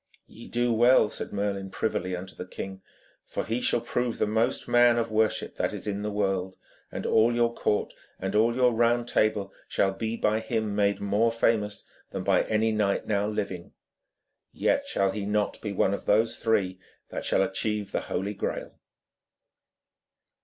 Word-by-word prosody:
'Ye 115 Hz, -, -13 dB
do 120 Hz, 0 st, +1 dB
well,' 120 Hz, 0 st, +5 dB
said -, -, -5 dB
Merlin 100 Hz, -1 st, -2 dB
privily 95 Hz, -3 st, -2 dB
unto 95 Hz, +1 st, -8 dB
the 90 Hz, -, -7 dB
king, 95 Hz, +1 st, -7 dB, 0.4 s
'for -, -, -4 dB
he 115 Hz, +4 st, -1 dB
shall 120 Hz, -, +2 dB
prove 120 Hz, 0 st, -2 dB
the -, -, +2 dB
most 110 Hz, +5 st, 0 dB
man 120 Hz, 0 st, +5 dB
of 115 Hz, -1 st, -1 dB
worship 110 Hz, 0 st, +1 dB
that -, -, 0 dB
is -, -, -6 dB
in 100 Hz, -1 st, -2 dB
the 105 Hz, -, -2 dB
world, 95 Hz, -2 st, -1 dB, 0.3 s
and -, -, -5 dB
all 115 Hz, +2 st, +4 dB
your 120 Hz, 0 st, +2 dB
court 105 Hz, -, 0 dB, 0.3 s
and 95 Hz, +1 st, -3 dB
all 115 Hz, +3 st, +3 dB
your 125 Hz, -1 st, +4 dB
Round 120 Hz, +1 st, +2 dB
Table 105 Hz, -3 st, +1 dB
shall 95 Hz, 0 st, +1 dB
be 110 Hz, +3 st, -3 dB
by 110 Hz, 0 st, +1 dB
him 110 Hz, -2 st, -2 dB
made 100 Hz, -1 st, +2 dB
more 105 Hz, +3 st, +2 dB
famous 110 Hz, -3 st, 0 dB, 0.3 s
than -, -, -4 dB
by -, -, +3 dB
any 110 Hz, +1 st, +1 dB
knight 105 Hz, -2 st, 0 dB
now 105 Hz, -1 st, 0 dB
living. 100 Hz, -4 st, -4 dB, 0.8 s
Yet -, -, 0 dB
shall 95 Hz, -1 st, +1 dB
he 100 Hz, 0 st, -4 dB
not 105 Hz, 0 st, 0 dB
be 105 Hz, -, -3 dB
one 100 Hz, 0 st, +2 dB
of 100 Hz, -, -5 dB
those 110 Hz, +2 st, +3 dB
three 100 Hz, -5 st, 0 dB, 0.3 s
that -, -, -5 dB
shall 95 Hz, -, +2 dB
achieve 105 Hz, +2 st, -2 dB
the -, -, -1 dB
Holy 100 Hz, +2 st, -3 dB
Graal.' -, -, -4 dB
105 Hz, 175 wpm, -27 LUFS, 100-115 Hz, 0.8 s, well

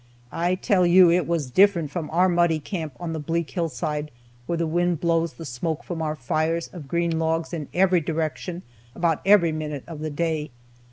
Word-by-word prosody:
I 175 Hz, +2 st, +1 dB
tell 185 Hz, -1 st, +2 dB
you, 175 Hz, 0 st, +7 dB
it 175 Hz, +1 st, +2 dB
was 160 Hz, -6 st, -1 dB
different 180 Hz, -4 st, +4 dB
from 165 Hz, -3 st, -4 dB
our 180 Hz, +3 st, +3 dB
muddy 175 Hz, -2 st, +3 dB
camp 160 Hz, -2 st, -5 dB
on 170 Hz, -2 st, -4 dB
the 160 Hz, -, -3 dB
bleak 165 Hz, 0 st, -2 dB
hillside, 150 Hz, -1 st, -2 dB, 0.4 s
where 170 Hz, -, -1 dB
the 165 Hz, -, 0 dB
wind 175 Hz, 0 st, 0 dB
blows 165 Hz, -1 st, +1 dB
the 165 Hz, -, -9 dB
smoke 150 Hz, +5 st, -3 dB
from 170 Hz, -2 st, -5 dB
our 155 Hz, -1 st, -1 dB
fires 155 Hz, +5 st, -1 dB
of 165 Hz, -6 st, -9 dB
green 170 Hz, +1 st, 0 dB
logs 160 Hz, +1 st, -1 dB
in 155 Hz, -4 st, -4 dB
every 180 Hz, -1 st, +3 dB
direction 165 Hz, +3 st, -3 dB, 0.3 s
about 170 Hz, -3 st, +1 dB
every 195 Hz, -5 st, +6 dB
minute 150 Hz, -3 st, -4 dB
of 165 Hz, -3 st, -8 dB
the 155 Hz, 0 st, -3 dB
day. 155 Hz, 0 st, -2 dB
165 Hz, 190 wpm, -24 LUFS, 155-175 Hz, 0.4 s, you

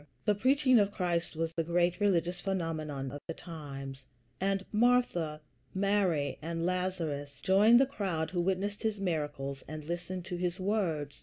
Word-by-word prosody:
The 210 Hz, -, +4 dB
preaching 255 Hz, +3 st, +4 dB
of 200 Hz, -1 st, +3 dB
Christ 175 Hz, -5 st, -1 dB
was 165 Hz, +1 st, -2 dB
the 165 Hz, -, 0 dB
great 175 Hz, +2 st, +1 dB
religious 180 Hz, -3 st, +1 dB
phenomenon 155 Hz, -8 st, -2 dB
of 145 Hz, +1 st, -7 dB
the 165 Hz, -, -4 dB
times, 140 Hz, -5 st, -8 dB, 0.4 s
and 195 Hz, 0 st, 0 dB
Martha, 210 Hz, -10 st, +2 dB, 0.3 s
Mary, 190 Hz, -8 st, +1 dB
and 165 Hz, +1 st, -2 dB
Lazarus 175 Hz, -6 st, -2 dB
joined 210 Hz, +5 st, +6 dB
the 270 Hz, -, +6 dB
crowd 185 Hz, -, -2 dB
who 175 Hz, -2 st, 0 dB
witnessed 195 Hz, +3 st, -1 dB
his 220 Hz, -2 st, -1 dB
miracles 145 Hz, -6 st, -2 dB
and 155 Hz, 0 st, -7 dB
listened 175 Hz, +2 st, -4 dB
to 180 Hz, -, -4 dB
his 180 Hz, 0 st, -2 dB
words. 180 Hz, -8 st, -1 dB
175 Hz, 155 wpm, -31 LUFS, 155-195 Hz, 0.4 s, joined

